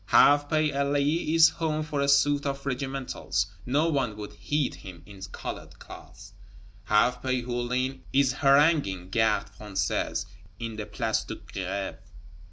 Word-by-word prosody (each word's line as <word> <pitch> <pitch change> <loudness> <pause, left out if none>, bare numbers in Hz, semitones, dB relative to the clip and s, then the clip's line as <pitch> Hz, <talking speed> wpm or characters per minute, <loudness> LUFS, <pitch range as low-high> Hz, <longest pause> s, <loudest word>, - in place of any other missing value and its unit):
Half 145 0 +5
pay 155 -1 +2
Elie 145 +4 +1
is 165 0 +8
home 155 -1 -2
for 150 -2 -2
a 140 - +1
suit 145 +1 +3
of 140 0 -4
regimentals; 135 -7 -2 0.2
no 145 +6 +2
one 135 -9 -1
would 105 -1 -7
heed 150 -2 -1
him 90 -4 -11
in 100 -1 -13
colored - - -7
clothes; 100 +1 -13 0.5
half 120 +5 +2
pay 130 -1 -1
Hulin 125 +2 -2
is 135 -2 +3
haranguing 140 - +3
Gardes 110 -1 +1
Françaises 95 -4 -2 0.3
in 115 0 -5
the 105 -1 -6
Place - - -1
de - - -6
Grève. 95 +1 -5
135 Hz, 145 wpm, -27 LUFS, 105-145 Hz, 0.5 s, is